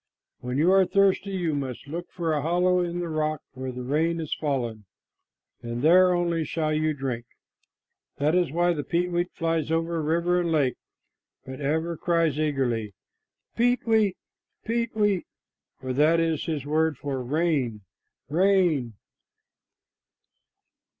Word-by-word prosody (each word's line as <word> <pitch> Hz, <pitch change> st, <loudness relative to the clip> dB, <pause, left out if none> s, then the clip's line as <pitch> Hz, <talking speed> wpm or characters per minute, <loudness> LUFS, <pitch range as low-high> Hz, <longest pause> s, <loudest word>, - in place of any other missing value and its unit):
When 125 Hz, +1 st, -4 dB
you 165 Hz, +5 st, +4 dB
are 195 Hz, 0 st, +6 dB
thirsty, 195 Hz, +1 st, +2 dB
you 175 Hz, -4 st, -1 dB
must 135 Hz, -2 st, -4 dB
look 170 Hz, +4 st, -6 dB
for 165 Hz, -3 st, -2 dB
a 150 Hz, -, 0 dB
hollow 180 Hz, +3 st, +2 dB
in 175 Hz, 0 st, -2 dB
the 175 Hz, -, -3 dB
rock 155 Hz, -2 st, -2 dB
where 130 Hz, 0 st, -5 dB
the 125 Hz, 0 st, -6 dB
rain 160 Hz, +6 st, 0 dB
has 160 Hz, -3 st, -3 dB
fallen, 120 Hz, -8 st, -2 dB, 0.8 s
and 120 Hz, +1 st, -5 dB
there 180 Hz, +3 st, +6 dB
only 170 Hz, -2 st, 0 dB
shall 155 Hz, -1 st, -1 dB
you 155 Hz, 0 st, 0 dB
drink." 130 Hz, -4 st, -3 dB, 0.9 s
That 150 Hz, +3 st, +1 dB
is 180 Hz, -5 st, +2 dB
why 175 Hz, +2 st, +2 dB
the 150 Hz, -3 st, -3 dB
peetweet 175 Hz, +2 st, -1 dB
flies 165 Hz, -2 st, -1 dB
over 165 Hz, 0 st, 0 dB
river 170 Hz, +3 st, +1 dB
and 170 Hz, -1 st, -1 dB
lake, 140 Hz, -5 st, +2 dB, 0.7 s
but 130 Hz, +2 st, -8 dB
ever 160 Hz, +4 st, -1 dB
cries 165 Hz, -4 st, +1 dB
eagerly, 120 Hz, -, -1 dB, 0.6 s
"Peet 245 Hz, +1 st, +2 dB
weet, 220 Hz, -4 st, +2 dB, 0.5 s
peet 230 Hz, 0 st, -1 dB
weet!" 205 Hz, -4 st, +1 dB, 0.5 s
for 130 Hz, -1 st, -4 dB
that 155 Hz, +5 st, +4 dB
is 165 Hz, -2 st, 0 dB
his 155 Hz, -5 st, -3 dB
word 155 Hz, 0 st, +1 dB
for 135 Hz, -2 st, -3 dB
"Rain, 140 Hz, -6 st, 0 dB, 0.5 s
rain!" 170 Hz, -, +2 dB
160 Hz, 145 wpm, -26 LUFS, 140-175 Hz, 0.9 s, are